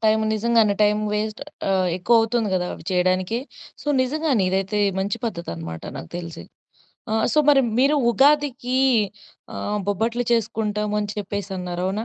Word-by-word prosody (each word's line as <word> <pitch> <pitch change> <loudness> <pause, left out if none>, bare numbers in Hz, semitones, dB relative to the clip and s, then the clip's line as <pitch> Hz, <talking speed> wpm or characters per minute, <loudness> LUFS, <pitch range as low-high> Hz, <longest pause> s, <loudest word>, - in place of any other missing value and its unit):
Time 220 0 +4
నిజంగానే 220 -1 +3
time 210 0 +3
waste 215 +2 -2 0.3
ఆహ్, 185 -2 +2
ఎక్కువ 230 +6 +3
అవుతుంది 225 -1 0
గదా! 180 -1 0
అవి - - -13
చేయడానికి. 185 +4 +1 0.4
సో, - - -18 0.2
నిజంగానే 280 -4 0
ఇదైతే 195 +2 -1 0.2
మంచి 195 +3 -1
పద్ధతన్నమాట 85 - -5
నాకు 80 - -8
తెలిసి. 170 -1 -7 0.7
ఆ! - - -1 0.2
సో, 305 - +2
మరి 280 -2 +7 0.2
మీరు 280 +3 +4
ఉగాదికి 270 -2 +2 0.8
ఆహ్, 210 0 -2
బొబ్బట్లు 230 +5 0
చేసుకుంటామని 210 -2 -1
చెప్పేసి 205 0 -4
అన్నారు 180 -1 -4
అవునా? 205 +4 -2
210 Hz, 140 wpm, -23 LUFS, 190-235 Hz, 0.8 s, మరి